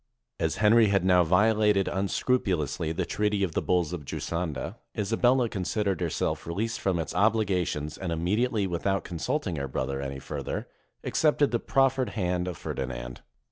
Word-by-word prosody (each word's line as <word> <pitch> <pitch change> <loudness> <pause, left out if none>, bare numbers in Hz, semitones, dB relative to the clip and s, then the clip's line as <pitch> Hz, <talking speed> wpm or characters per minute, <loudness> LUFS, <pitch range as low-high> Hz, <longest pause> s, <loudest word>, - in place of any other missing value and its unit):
As 80 +2 0
Henry 110 +2 +5
had 95 -2 +2
now 90 -1 +5
violated 105 +3 +3
un 95 +1 -1
scrupulously 90 - 0
the 80 - -1
treaty 105 -1 0
of 90 - 0
the - - -1
Bulls 90 -2 +1
of 85 -4 -5
Giusanda, 80 0 -4 0.2
Isa 105 +2 -1
bella 125 +1 +3
considered 100 -2 -1
herself - - -1
released 110 +7 -2
from 95 -3 +1
its 80 - -3
obligations, 90 -7 +1
and 90 -3 -3
immediately, 105 +6 +1
without 95 +2 -1
consulting 90 - -2
her 70 -1 -2
brother 65 +1 -2
any 70 0 -4
further, - - -5 0.4
accepted 150 -2 +2
the 120 - +1
proffered 135 -1 +2
hand 90 -2 0
of 90 -3 -4
Ferdinand. - - -5
95 Hz, 160 wpm, -27 LUFS, 80-110 Hz, 0.4 s, Henry